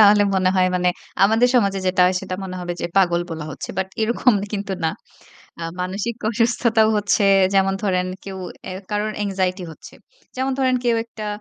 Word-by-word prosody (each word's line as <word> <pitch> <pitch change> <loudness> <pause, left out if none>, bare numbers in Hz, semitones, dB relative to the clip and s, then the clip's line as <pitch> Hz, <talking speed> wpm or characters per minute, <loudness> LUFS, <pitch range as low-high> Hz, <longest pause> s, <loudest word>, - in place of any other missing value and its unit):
তাহলে 205 0 +7
মনে 185 -1 +2
হয় 185 0 +4
মানে 180 0 +2 0.4
আমাদের 225 +4 +4
সমাজে 200 -5 +3
যেটা 185 0 +1
হয় 185 - +1
সেটা 185 - -5
মনে 185 -1 -6
হবে 175 0 -3
যে - - -1
পাগল 175 -3 +4
বলা 160 -2 -5
হচ্ছে। - - -7
বাট 190 0 -1
এরকম 235 +2 +3 0.2
কিন্তু 200 -1 -3
না। - - +3 0.7
আ - - -3 0.2
মানসিক 195 +5 -3
অসুস্থতাও 230 -1 +2
হচ্ছে 205 0 +2 0.3
যেমন 195 0 +3
ধরেন 185 -2 +1 0.2
কেউ 195 -1 -7 0.3
অ্যা 185 0 -5
কারো 210 0 0 0.2
anxiety 190 -1 -1
হচ্ছে। - - -14 0.4
যেমন 260 +1 0
ধরেন 260 -1 +2
কেউ 235 -1 +3
একটা 220 -2 -8
195 Hz, 180 wpm, -21 LUFS, 185-220 Hz, 0.7 s, তাহলে